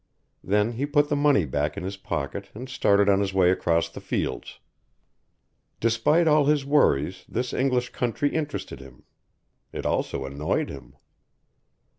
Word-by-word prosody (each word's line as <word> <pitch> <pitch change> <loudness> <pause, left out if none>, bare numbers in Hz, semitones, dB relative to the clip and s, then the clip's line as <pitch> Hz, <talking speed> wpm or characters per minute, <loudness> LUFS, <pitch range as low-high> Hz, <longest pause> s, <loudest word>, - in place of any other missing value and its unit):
Then 105 +3 +1
he 130 +5 -3
put 145 0 +2
the 150 - +1
money 145 - +3
back 75 +5 -2
in 100 - -4
his 95 +2 -4
pocket 95 0 -5
and 125 +4 -7
started 100 -5 +2
on 100 -1 +4
his 95 -1 -2
way 90 -2 +5
across 85 -2 +1
the - - -11
fields. - - -3 1.2
Despite 115 +9 +2
all 150 -2 +4
his 145 -1 +2
worries 90 - +2
this 125 +2 -3
English 125 -2 0
country 125 +4 -1
interested 150 - -4
him, 65 -2 -14 0.7
it - - -6
also 65 - -1
annoyed 70 +3 -2
him. 70 -2 -11
105 Hz, 150 wpm, -25 LUFS, 90-140 Hz, 1.2 s, way